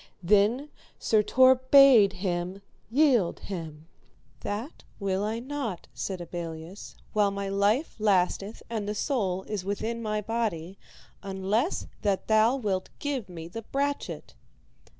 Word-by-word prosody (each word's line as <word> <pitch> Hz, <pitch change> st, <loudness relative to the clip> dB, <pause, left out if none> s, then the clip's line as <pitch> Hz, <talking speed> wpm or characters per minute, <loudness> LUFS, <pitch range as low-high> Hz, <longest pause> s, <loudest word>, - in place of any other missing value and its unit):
Then 210 Hz, -, +3 dB, 0.3 s
Sir 215 Hz, -1 st, +3 dB
Tor 255 Hz, +4 st, +6 dB, 0.2 s
bade 260 Hz, -8 st, +8 dB
him 180 Hz, 0 st, -3 dB, 0.3 s
yield 245 Hz, -, +3 dB
him. 160 Hz, -5 st, -7 dB, 0.5 s
That 215 Hz, -, -5 dB, 0.2 s
will 195 Hz, -1 st, -1 dB
I 215 Hz, +2 st, -1 dB
not, 245 Hz, -7 st, -5 dB
said 190 Hz, -2 st, -4 dB
Abelleus, 170 Hz, +1 st, -7 dB, 0.2 s
while 210 Hz, -1 st, +3 dB
my 200 Hz, 0 st, -4 dB
life 205 Hz, +9 st, +1 dB
lasteth 200 Hz, 0 st, +1 dB
and 215 Hz, -3 st, -3 dB
the 210 Hz, -, -2 dB
soul 195 Hz, -7 st, -1 dB
is 210 Hz, -2 st, -4 dB
within 220 Hz, +4 st, -3 dB
my 215 Hz, -1 st, -1 dB
body, 205 Hz, -5 st, -3 dB, 0.4 s
unless 200 Hz, -, -1 dB, 0.2 s
that 200 Hz, -2 st, 0 dB
thou 220 Hz, +3 st, +4 dB
wilt 200 Hz, -8 st, -2 dB
give 270 Hz, -9 st, -3 dB
me 165 Hz, -2 st, -8 dB
the 225 Hz, +7 st, -7 dB
brachet. 280 Hz, +5 st, -3 dB
205 Hz, 130 wpm, -27 LUFS, 190-230 Hz, 0.5 s, bade